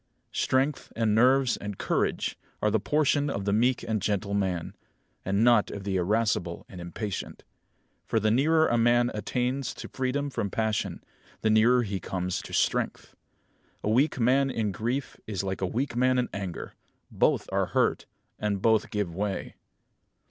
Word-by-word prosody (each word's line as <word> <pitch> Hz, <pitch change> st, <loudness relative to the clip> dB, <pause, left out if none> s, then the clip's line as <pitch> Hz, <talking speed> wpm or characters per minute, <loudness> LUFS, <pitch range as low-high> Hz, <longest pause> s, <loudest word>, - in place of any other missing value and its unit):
Strength 135 Hz, +2 st, 0 dB
and 115 Hz, -2 st, +1 dB
nerves 130 Hz, +3 st, +4 dB
and 100 Hz, -1 st, -6 dB
courage -, -, 0 dB, 0.2 s
are 105 Hz, -, +1 dB
the 110 Hz, -, +2 dB
portion 145 Hz, +3 st, +1 dB
of 100 Hz, -7 st, -3 dB
the 100 Hz, -, +1 dB
meek 125 Hz, +4 st, +2 dB
and 110 Hz, -2 st, -1 dB
gentle 100 Hz, 0 st, -1 dB
man; 95 Hz, -4 st, -1 dB, 0.5 s
and 100 Hz, +3 st, +1 dB
not 120 Hz, -3 st, +5 dB
of 100 Hz, -, -6 dB
the 100 Hz, -1 st, -2 dB
irascible 95 Hz, -2 st, 0 dB
and 90 Hz, -2 st, -10 dB
impatient. 95 Hz, +4 st, -5 dB, 0.6 s
For 115 Hz, -, +2 dB
the 110 Hz, 0 st, +2 dB
nearer 155 Hz, +6 st, +4 dB
a 120 Hz, -, +2 dB
man 120 Hz, +1 st, +3 dB
attains 125 Hz, +5 st, -2 dB
to -, -, -7 dB
freedom 135 Hz, +2 st, -2 dB
from 100 Hz, -, -2 dB
passion, 110 Hz, +1 st, -2 dB, 0.4 s
the 110 Hz, -, +2 dB
nearer 120 Hz, +3 st, +5 dB
he 100 Hz, -3 st, -3 dB
comes 90 Hz, +2 st, -3 dB
to -, -, -11 dB
strength. -, -, -1 dB, 0.7 s
A 105 Hz, -, +1 dB
weak 135 Hz, +4 st, +2 dB
man 135 Hz, +3 st, +3 dB
in 110 Hz, -5 st, -1 dB
grief 120 Hz, +8 st, -3 dB
is 100 Hz, -3 st, -2 dB
like 95 Hz, 0 st, -3 dB
a 95 Hz, -, +1 dB
weak 120 Hz, +5 st, -2 dB
man 130 Hz, +1 st, +3 dB
in 125 Hz, -, 0 dB
anger. 95 Hz, -4 st, -5 dB, 0.4 s
Both -, -, +2 dB
are -, -, +1 dB
hurt, -, -, +1 dB, 0.3 s
and 105 Hz, -2 st, -1 dB
both 110 Hz, +3 st, +2 dB
give 105 Hz, -6 st, -2 dB
way. 100 Hz, +2 st, -3 dB
110 Hz, 165 wpm, -27 LUFS, 100-125 Hz, 0.7 s, not